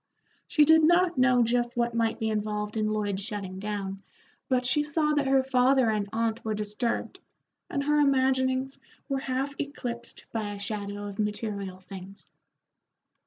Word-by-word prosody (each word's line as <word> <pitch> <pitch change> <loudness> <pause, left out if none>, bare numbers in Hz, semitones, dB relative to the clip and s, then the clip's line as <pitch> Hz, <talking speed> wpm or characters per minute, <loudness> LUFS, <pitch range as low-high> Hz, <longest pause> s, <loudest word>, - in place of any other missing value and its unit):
She 300 -2 +5
did 320 +1 +7
not 345 -1 +4
know 255 -1 +5
just 240 +1 0
what 235 0 +1
might 230 -1 +1
be 220 0 -1
involved 210 0 -2
in 215 -1 +1
Lloyd's 205 -2 -1
shutting 200 -3 -5
down, 200 -1 -4 0.5
but 255 -1 +2
she 260 +4 +3
saw 300 +1 +1
that 290 -2 +1
her 270 0 +4
father 260 -2 +3
and 205 -2 -1
aunt 225 0 -1
were 220 -1 -1
disturbed, 210 +3 -2 0.5
and 280 - -1
her 295 +1 +3
imaginings 260 -1 +2 0.3
were 275 -2 -1
half 265 +1 -2
eclipsed 240 -4 -5
by 215 -2 -3
a 200 - -8
shadow 205 0 -4
of 200 0 -7
material 205 -3 -3
things. 190 +1 -11
235 Hz, 160 wpm, -28 LUFS, 210-265 Hz, 0.5 s, did